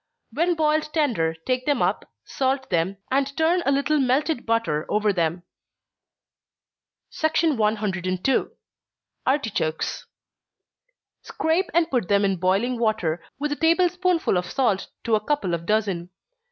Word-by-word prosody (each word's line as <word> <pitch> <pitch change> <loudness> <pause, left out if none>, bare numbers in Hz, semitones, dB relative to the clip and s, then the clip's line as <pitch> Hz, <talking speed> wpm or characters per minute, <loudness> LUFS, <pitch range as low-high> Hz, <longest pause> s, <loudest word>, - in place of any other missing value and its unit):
When 340 +6 +1
boiled 310 -1 +1
tender, 220 - +1
take 255 +1 -1
them 290 - +2
up, - - -1 0.2
salt 265 0 -1
them, 180 +3 0
and 275 +1 0
turn 330 +3 +3
a - - +4
little 280 +2 +1
melted 270 +1 0
butter 225 -10 0
over 210 -1 +2
them. 170 -1 -1 1.8
102. 215 - +1 0.8
Artichokes. 225 - -1 1.1
Scrape 335 +4 -1
and 335 -1 +2
put 245 -8 0
them 200 +1 +3
in 195 -1 0
boiling 200 +8 +1
water, 180 -8 0
with 295 +2 -2
a - - 0
table 335 +3 +3
spoonful 360 - +1
of 180 0 -3
salt 235 -8 0 0.2
to 230 - -1
a 215 -1 +2
couple 250 -10 -1
of 170 0 -3
dozen. 200 -5 0
245 Hz, 130 wpm, -24 LUFS, 190-300 Hz, 1.8 s, a